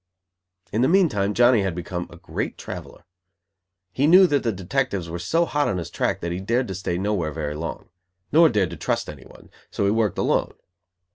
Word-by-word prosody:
In 110 - 0
the 130 - +4
meantime 120 - +2
Johnny 120 -2 +5
had 95 -3 -2
become 90 0 -5
a - - -13
great - - -4
traveller. 85 - -9 0.9
He 140 +7 +1
knew 185 +4 +8
that 145 -6 +1
the 115 - 0
detectives 95 -3 -2
were 85 - -4
so 165 - +1
hot 145 -2 0
on 95 - -1
his 85 - -5
track - - -1
that 85 - -3
he 90 - -3
dared 120 +6 0
to - - -3
stay 90 -2 -3
nowhere 95 -5 -1
very 75 -1 -4
long; 80 +2 -6 0.4
nor 160 +2 +6
dared 105 - 0
to - - -7
trust - - -2
anyone: 70 -4 -13 0.2
so 100 - -1
he 100 - +3
worked 110 -3 0
alone. - - 0
100 Hz, 200 wpm, -23 LUFS, 85-130 Hz, 0.9 s, knew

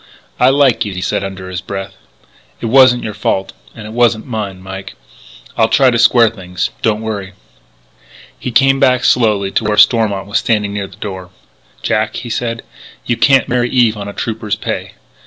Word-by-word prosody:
"I 125 - +5
liked 135 -3 +3
you," 105 - -5
he 90 - -4
said - - -1
under 95 -1 -7
his 90 0 -5
breath. 95 -1 -6 0.7
"It - - -5
wasn't 125 +1 +5
your 110 - -4
fault. 95 -1 -2 0.2
And 105 - -9
it 110 - -8
wasn't 120 -2 +2
mine, 105 -6 -5
Mike.... 95 +1 -8 0.6
I'll 110 - +3
try 135 -2 +4
to 120 - 0
square 115 -1 +5
things. 90 -4 -4
Don't 110 0 0
worry." 100 -3 -5 1.1
He - - -4
came 135 +2 +3
back 130 -2 +3
slowly 105 -5 +2
to - - 0
where 105 0 0
Stormont 105 -2 +3
was 100 +2 0
standing 105 -3 0
near 100 -1 -3
the 95 - -16
door: 95 -4 -7 0.5
"Jack," 110 0 0
he 120 - -6
said, 115 0 -3 0.4
"you 120 - 0
can't 135 +1 +3
marry 125 0 0
Eve 120 -3 +3
on 100 -1 -6
a 100 - -7
Trooper's 110 -2 -3
pay. - - -5
110 Hz, 185 wpm, -15 LUFS, 100-120 Hz, 1.1 s, I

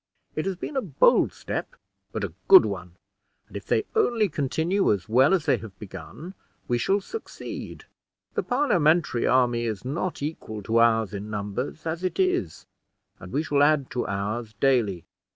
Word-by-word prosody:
It 155 +4 -2
has 195 - -1
been 235 +10 -6
a 265 - +1
bold 160 - +3
step, - - -5 0.4
but 110 0 -4
a 95 -5 -4
good - - +9
one; 90 -4 -5 0.5
and - - -16
if - - -7
they - - +1
only 235 - +2
continue 160 +7 0
as 100 +1 -1
well 130 +6 +4
as 185 -6 +2
they - - +3
have 105 -2 -11
begun, 105 - -9 0.3
we 120 -1 +1
shall 195 - +1
succeed. 445 - -8 0.5
The - - 0
Parliamentary 170 - +2
army 120 -2 +2
is 110 0 -4
not 160 +4 -3
equal 110 -9 -5
to 115 +4 0
ours 115 -3 +3
in 100 +1 -5
numbers, 105 +9 -4
as 165 +2 -3
it 185 - -2
is; 370 -1 0 0.5
and - - -10
we 150 - 0
shall 145 -2 +1
add 145 -2 +3
to 125 - -2
ours 105 +3 -3
dayly. 115 -10 +2
130 Hz, 170 wpm, -25 LUFS, 110-170 Hz, 0.5 s, good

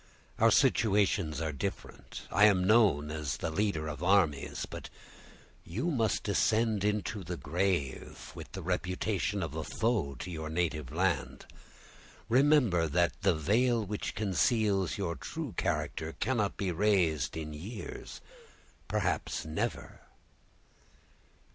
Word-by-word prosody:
Our - - +6
situations 100 -7 +2
are 80 -1 -1
different; 70 - -6
I 105 - +6
am 95 -4 +4
known 95 -9 +4
as 75 -3 -3
the 80 - -3
leader 80 -3 0
of 75 -1 -6
armies—but 90 -6 0 0.7
you 120 - -2
must 115 -7 0
descend 110 +1 +1
into 105 -1 -1
the 90 +1 -5
grave 85 -4 -2
with - - -10
the 95 - -6
reputation 90 +2 -1
of 80 -3 -4
a 80 0 -3
foe 105 - -1
to 90 +8 -7
your 80 -2 -5
native 80 -2 -2
land. - - -1 0.8
Remember 125 - +4
that 85 +2 +2
the 95 -3 +3
veil 110 - +2
which 105 +1 -4
conceals 100 - +1
your 95 -4 -1
true 155 -8 -6
character 80 -1 -2
cannot 110 -6 0
be 95 -2 -1
raised 85 -6 +1
in 75 -1 -5
years—perhaps 115 - -5
never." - - -3
95 Hz, 120 wpm, -31 LUFS, 80-105 Hz, 0.8 s, Our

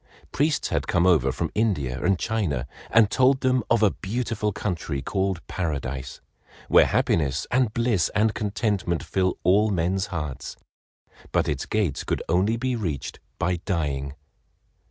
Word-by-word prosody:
Priests 145 +2 +1
had - - -1
come 85 - +2
over 75 -8 +4
from 80 +4 -3
India 75 - 0
and 95 +1 +3
China 90 - -1 0.2
and 110 -2 +5
told 130 +1 +3
them 130 -1 +2
of 115 -1 +3
a 105 - +5
beautiful 110 0 -2
country 80 -7 -3
called 95 +4 -2
Paradise, 70 -7 -4 0.5
where - - +6
happiness 75 -2 +1
and 125 -3 +2
bliss 115 -7 +1
and 110 0 +3
contentment 100 -5 -1
fill 95 -1 0
all 105 +4 +4
men's 95 +1 0
hearts, 75 -6 -5 0.8
but - - +1
its - - -2
gates 100 -10 0
could - - -2
only 95 +7 +2
be 130 +1 -1
reached 85 - -4 0.2
by 90 -1 0
dying. 75 -7 -2
95 Hz, 145 wpm, -25 LUFS, 80-110 Hz, 0.8 s, where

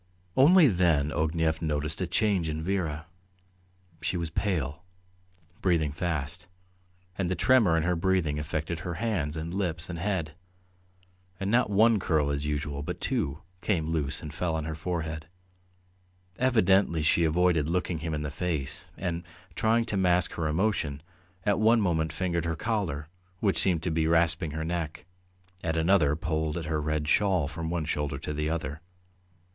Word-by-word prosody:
Only 160 +5 +7
then 85 - +2
Ognev 80 0 0
noticed 75 +1 -1
a 90 - 0
change 95 -4 +1
in 80 0 -3
Vera. 80 -5 -2 1.0
She 85 +2 -1
was 85 -2 -3
pale, 80 -6 -1 0.8
breathing 80 -5 +2
fast, 75 -3 -3 0.7
and 90 -3 0
the 95 - 0
tremor 110 -10 +4
in 80 - +1
her 90 +1 +1
breathing 85 -4 +1
affected 80 +2 -3
her 85 +2 -4
hands 85 -10 -1
and 80 +2 -4
lips 90 -3 -2
and 85 - -5
head, 90 -4 -1 1.1
and 95 +1 -1
not 120 -1 +3
one 110 +2 +4
curl 75 -5 +1
as 70 +1 -2
usual, 75 -1 -2
but 75 - -5
two, 70 +5 -2 0.2
came 80 -6 0
loose 75 -3 -1
and 75 -1 -7
fell 80 0 -1
on 80 - -2
her 80 - -3
forehead.... 80 -1 -4 1.1
Evidently 100 -9 +3
she 85 +2 +4
avoided 80 -1 +2
looking 90 -1 -1
him 80 -1 -3
in 75 - -3
the 75 - -3
face, 80 -4 -3
and, 85 -2 -2 0.3
trying 115 +1 +2
to 105 - -1
mask 90 -2 +3
her 80 -2 -2
emotion, 80 -4 0 0.4
at 105 -1 +2
one 115 +2 +5
moment 80 -6 +1
fingered 85 -3 -1
her 85 -1 -1
collar, 85 -7 -2 0.3
which 100 -2 +1
seemed 85 -4 +2
to 90 - -1
be 80 0 +1
rasping 80 0 +2
her 80 +2 -4
neck, 85 0 -3 0.6
at 80 0 -1
another 80 -3 +3
pulled 80 0 -2
her 75 -1 -1
red 75 0 -1
shawl 95 -3 +2
from 80 +1 -5
one 85 -2 -1
shoulder 75 -2 -2
to 75 +1 -5
the 75 +1 -1
other. 80 -1 -3
80 Hz, 160 wpm, -28 LUFS, 75-90 Hz, 1.1 s, Only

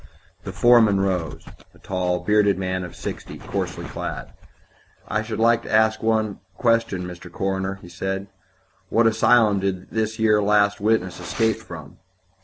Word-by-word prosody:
The - - -4
foreman 115 -5 +5
rose 90 -5 -2 0.3
a - - -18
tall, 90 -1 -2
bearded 105 -2 +3
man 95 -1 -2
of 90 - -9
sixty, - - -7
coarsely - - -4
clad. - - -6 0.8
"I 105 - 0
should 110 0 -5
like 115 +1 +3
to - - -9
ask 110 0 +3
one 110 -2 0 0.2
question, 115 -6 +1
Mr. 90 -1 -9
Coroner," 95 +1 -2
he 90 - -11
said. 95 +2 -3 0.6
"What 115 +1 +3
asylum 110 -2 +4
did 95 -1 -3
this 110 0 -1
yer 105 -1 +3
last 100 0 +2
witness 105 -5 0
escape 110 +6 0
from?" 80 -10 -11
100 Hz, 150 wpm, -23 LUFS, 95-110 Hz, 0.8 s, foreman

